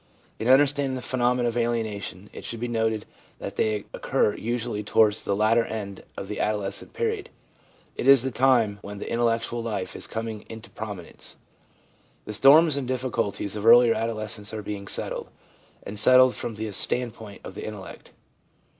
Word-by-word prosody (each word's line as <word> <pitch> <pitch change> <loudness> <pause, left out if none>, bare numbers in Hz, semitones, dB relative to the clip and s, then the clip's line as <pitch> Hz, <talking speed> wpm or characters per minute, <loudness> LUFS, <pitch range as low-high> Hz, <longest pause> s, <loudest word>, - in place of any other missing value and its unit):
In 110 - -2
understanding 135 0 +4
the 130 - -5
phenomena 125 -1 +1
of 115 - -2
alienation 110 -5 -2
it - - -9
should 115 - -4
be 120 - -2
noted 110 -2 -1 0.3
that - - -7
they 105 -1 0
occur 105 - +1
usually 120 -2 -3
towards 105 0 +3
the 100 - 0
latter 110 +3 +3
end 100 -4 -6 0.2
of 95 - -5
the 105 - -5
adolescent 105 -2 -2
period; 445 -3 -2 0.7
it - - -3
is 135 -3 +8
the 130 - -2
time 120 -5 +3
when 100 0 -8
the - - -6
intellectual 115 0 0
life 100 -5 -4
is - - -2
coming 110 -1 -5
into 110 +1 -10
prominence. 105 -6 -5 0.9
The 105 - -5
storms 145 +7 +6
and 135 -3 -3
difficulties 125 -6 -2
of 105 - -4
earlier 120 +1 +7
adolescence 110 -1 -3
are 105 - -5
being 100 -1 -6
settled, - - -3 0.5
and 105 +1 -4
settled 130 +3 +7
from 115 - -4
the 110 0 -4
standpoint 110 0 -1
of - - -8
the - - -7
intellect. 105 -4 -9
115 Hz, 165 wpm, -25 LUFS, 105-125 Hz, 0.9 s, is